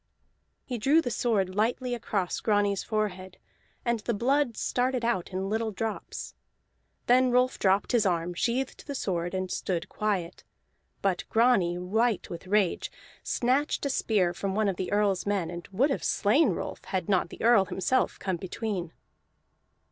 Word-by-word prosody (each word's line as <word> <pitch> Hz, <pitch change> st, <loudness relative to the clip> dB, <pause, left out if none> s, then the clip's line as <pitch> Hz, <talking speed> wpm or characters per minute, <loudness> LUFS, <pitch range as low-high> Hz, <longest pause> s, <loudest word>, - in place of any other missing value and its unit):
He 245 Hz, -3 st, -4 dB
drew 280 Hz, +8 st, +4 dB
the 250 Hz, -7 st, -1 dB
sword 210 Hz, -6 st, 0 dB
lightly 245 Hz, +4 st, 0 dB
across 205 Hz, -6 st, -2 dB
Grani's 205 Hz, -2 st, +1 dB
forehead, 190 Hz, -4 st, -3 dB, 0.5 s
and 235 Hz, -1 st, +1 dB
the 225 Hz, +2 st, -2 dB
blood 255 Hz, +2 st, +1 dB
started 250 Hz, -1 st, 0 dB
out 230 Hz, -7 st, 0 dB
in 190 Hz, +1 st, -2 dB
little 220 Hz, +2 st, -1 dB
drops. 220 Hz, +2 st, -5 dB, 0.7 s
Then 255 Hz, +1 st, +5 dB
Rolf 250 Hz, +1 st, +2 dB
dropped 195 Hz, +1 st, +2 dB
his 235 Hz, -3 st, +3 dB
arm, 175 Hz, -2 st, 0 dB
sheathed 245 Hz, +8 st, -1 dB
his 280 Hz, -2 st, -3 dB
sword, 175 Hz, -3 st, -2 dB
and 185 Hz, -1 st, -2 dB
stood 175 Hz, -3 st, -2 dB
quiet; 195 Hz, -5 st, -2 dB, 0.6 s
but 190 Hz, -2 st, +1 dB
Grani, 220 Hz, -7 st, +3 dB
white 215 Hz, +5 st, 0 dB
with 170 Hz, +2 st, -7 dB
rage, 200 Hz, -2 st, +1 dB, 0.3 s
snatched 265 Hz, +5 st, 0 dB
a 280 Hz, -, +1 dB
spear 195 Hz, -9 st, +1 dB
from 195 Hz, +2 st, -3 dB
one 215 Hz, 0 st, +2 dB
of 190 Hz, -3 st, -1 dB
the 185 Hz, -, -3 dB
Earl's 205 Hz, -2 st, +1 dB
men, 190 Hz, -5 st, 0 dB
and 175 Hz, -1 st, -7 dB
would 260 Hz, +9 st, +2 dB
have -, -, -2 dB
slain 245 Hz, +7 st, +3 dB
Rolf 175 Hz, -, -4 dB
had 185 Hz, -3 st, -2 dB
not 185 Hz, -3 st, +2 dB
the -, -, -9 dB
Earl 225 Hz, -4 st, +6 dB
himself 225 Hz, +8 st, 0 dB
come 190 Hz, -2 st, -2 dB
between. 190 Hz, -1 st, -4 dB
205 Hz, 160 wpm, -28 LUFS, 185-240 Hz, 0.7 s, Earl